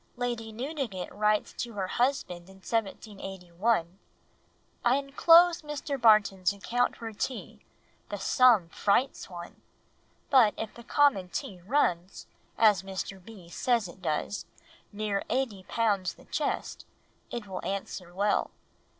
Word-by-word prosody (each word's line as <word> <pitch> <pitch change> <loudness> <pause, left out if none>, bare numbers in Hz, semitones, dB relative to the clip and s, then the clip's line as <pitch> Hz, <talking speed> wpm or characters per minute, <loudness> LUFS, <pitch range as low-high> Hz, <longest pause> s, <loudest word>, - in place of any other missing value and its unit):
Lady 240 -2 -3
Newdigate 240 - -4
writes 210 0 +1
to 235 -1 -5
her 195 -2 -2
husband 185 -6 -1
in 190 - -14
1781, 195 -2 -2 0.8
"I 240 +2 +4
enclose 330 +5 +5
Mr. 290 -3 -4
Barton's 205 -4 +5
account 240 +5 0
for 225 -2 -7
tea, 250 +4 -5 0.5
the 205 - -4
sum 215 -3 +4
frights 210 +10 0
one, 175 -1 -10 0.7
but 245 -6 +6
if 220 - -5
the 235 - -12
common 245 -8 +3
tea 180 +1 -5
runs—as 195 -2 +1
Mr. 190 0 -6
B. 190 -4 -13
says 230 +4 0
it 180 +2 -13
does—near 200 +4 -4
eighty 230 -7 -1
pounds 205 -6 0
the - - -18
chest, - - -3 0.4
it 235 -3 -5
will 190 -2 -6
answer 195 -2 -4
well. 200 +3 +1
210 Hz, 120 wpm, -29 LUFS, 190-245 Hz, 0.8 s, but